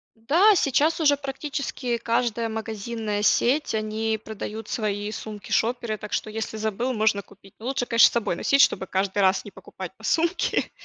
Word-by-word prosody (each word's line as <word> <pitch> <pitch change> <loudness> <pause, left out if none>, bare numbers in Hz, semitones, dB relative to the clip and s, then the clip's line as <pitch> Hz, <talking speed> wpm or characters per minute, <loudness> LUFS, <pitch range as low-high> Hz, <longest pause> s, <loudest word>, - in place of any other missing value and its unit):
М-да, 340 - +4
сейчас 300 +3 +2
уже 290 -3 +4
практически 275 -3 -3
каждая 230 0 0
магазинная 220 -1 -3
сеть- 250 +5 +2
они 220 0 -1
продают 220 0 -6
свои 210 -1 -2
сумки-шоперы, 220 +2 -2
так 210 0 -8
что, - - -1
если 220 0 -4
забыл, 220 +4 -1
можно 215 -2 +2
купить. 195 0 -19
Ну, 225 - -10
лучше, 265 -2 -1
конечно, 230 -1 +6
с - - -14
собой 230 -7 -1
носить, 275 +9 +3
чтобы 190 - +3
каждый 195 +1 -1
раз 190 0 +3
не 205 - -9
покупать 190 -1 -9
по 220 - -18
сумке, 335 +8 +1
220 Hz, 165 wpm, -25 LUFS, 210-250 Hz, -, конечно